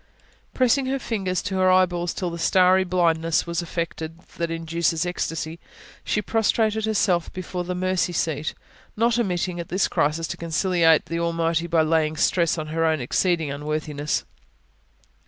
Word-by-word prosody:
Pressing 260 +1 +2
her 270 +1 0
fingers 195 -8 -2
to 190 - -2
her 185 0 +4
eyeballs 175 -2 +2
till 180 -2 -3
the 170 - -6
starry 185 +2 +4
blindness 165 -3 +1
was 170 0 -2
effected 165 -1 -4 0.2
that 170 -1 -1
induces 165 0 -1
ecstasy, 165 -2 -3 0.4
she 210 - -1
prostrated 220 0 +1
herself 195 -5 +1
before 185 -1 -4
the 180 +1 -4
mercy 185 0 0
seat, 155 -2 -2 0.4
not 235 +2 +2
omitting, 180 -4 -1
at 170 - -6
this 185 +2 +1
crisis, 155 +3 0
to - - -4
conciliate 170 -1 +2
the 165 0 -3
Almighty 170 0 0
by 165 -2 +3
laying 155 -1 +1
stress 170 0 +2
on 155 -1 -4
her 165 +1 0
own 160 -1 +2
exceeding 160 +4 0
unworthiness. 150 0 -2
170 Hz, 155 wpm, -24 LUFS, 165-185 Hz, 0.4 s, her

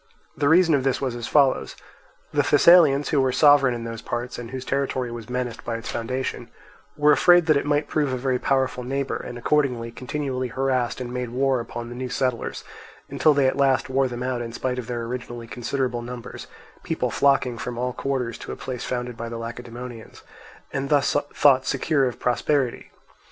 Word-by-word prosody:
The 140 -1 +1
reason 170 0 +5
of 140 -3 +2
this 135 -1 +1
was 130 -3 -2
as 120 -1 -5
follows. 140 -3 +2 0.6
The - - +3
Thessalians, 155 -5 +5
who 145 -3 +3
were 130 -1 +2
sovereign 140 -2 +5
in 115 - -6
those 115 -1 -6
parts, 120 +1 -4
and 120 -1 -7
whose 130 0 -6
territory 130 -3 -1
was 115 -1 -8
menaced 125 -2 -3
by 115 -1 -3
its 115 - -6
foundation, 120 0 -3 0.5
were 150 0 +5
afraid 175 +4 +5
that 155 -2 +4
it 140 - 0
might 145 0 +1
prove 145 -3 0
a 130 - -1
very 130 0 0
powerful 130 -2 0
neighbour, 135 +2 -2
and 120 - -7
accordingly 125 -3 0
continually 130 +1 -3
harassed 130 0 -1
and 125 -1 -5
made 125 -1 -3
war 130 +1 +1
upon 120 0 -6
the 120 - -8
new 130 0 -4
settlers, 125 -2 -2 0.5
until 155 -2 +3
they 140 -1 +3
at 130 - +1
last 135 -2 +2
wore 135 0 +2
them 120 0 -5
out 125 -1 -2
in 115 -1 -5
spite 125 +1 -2
of 120 - -6
their 120 -2 -3
originally 120 0 -6
considerable 125 +1 -2
numbers, 120 0 -8 0.3
people - - -2
flocking 130 -4 +2
from 125 -1 -5
all 125 +1 -2
quarters 130 -4 -3
to - - -7
a - - -4
place 125 -2 -6
founded 125 -1 -3
by 115 0 -6
the 115 - -5
Lacedaemonians, 120 0 -8 0.5
and 135 0 -2
thus 145 -2 +2 0.2
thought 130 -2 +4
secure 140 0 +1
of 125 - -5
prosperity. 125 +1 0
125 Hz, 195 wpm, -24 LUFS, 120-140 Hz, 0.6 s, reason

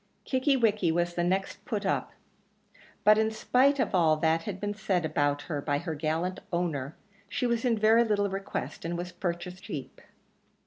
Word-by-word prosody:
Kickie 265 +1 +2
wickie 210 -7 +2
was 175 +1 0
the 175 - -1
next 190 +2 -1
put 205 -2 -3
up, 195 - 0 0.9
but 215 +1 +6
in 220 0 +2
spite 255 +5 +3
of 250 - 0
all 160 -4 +4
that 160 +2 +1
had 200 -3 -4
been 205 +1 -2
said 195 -5 0
about 145 -1 0
her 150 -4 -3
by 145 0 0
her 165 +2 -4
gallant 160 +4 -2
owner, 160 -5 -2 0.3
she 250 - -1
was 235 -1 0
in 235 -2 +2
very 220 +2 +5
little 205 -3 +1
request, 195 0 -5
and 170 +1 -3
was 175 +1 -5
purchased 180 +1 -4
cheap. 140 -4 -7
185 Hz, 180 wpm, -29 LUFS, 165-215 Hz, 0.9 s, but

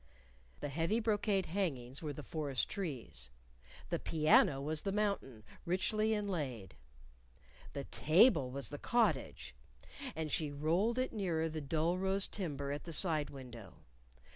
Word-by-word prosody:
The 145 - -2
heavy 165 +10 +1
brocade 210 -3 +1
hangings 145 -9 -2
were 155 -2 -3
the 145 +1 -7
forest 145 -5 -1
trees. 135 - -5 0.6
The - - +1
piano 155 -3 +4
was 150 +2 -2
the 195 - -2
mountain, 200 - -1 0.2
richly 215 +5 +1
inlaid. 150 - -3 1.0
The 140 - -3
table 155 - +4
was 135 +1 -3
the 145 - -5
cottage, 235 -2 +1 0.6
and 160 -2 -3
she 155 0 0
rolled 170 - +1
it 255 0 0
nearer 170 -6 0
the 155 0 -4
dull 160 +5 0
rose 195 +1 +2
timber 145 -8 -3
at 145 +1 -4
the 165 - -5
side 155 -3 +2
window. 120 -6 -10
160 Hz, 140 wpm, -35 LUFS, 140-195 Hz, 1.0 s, piano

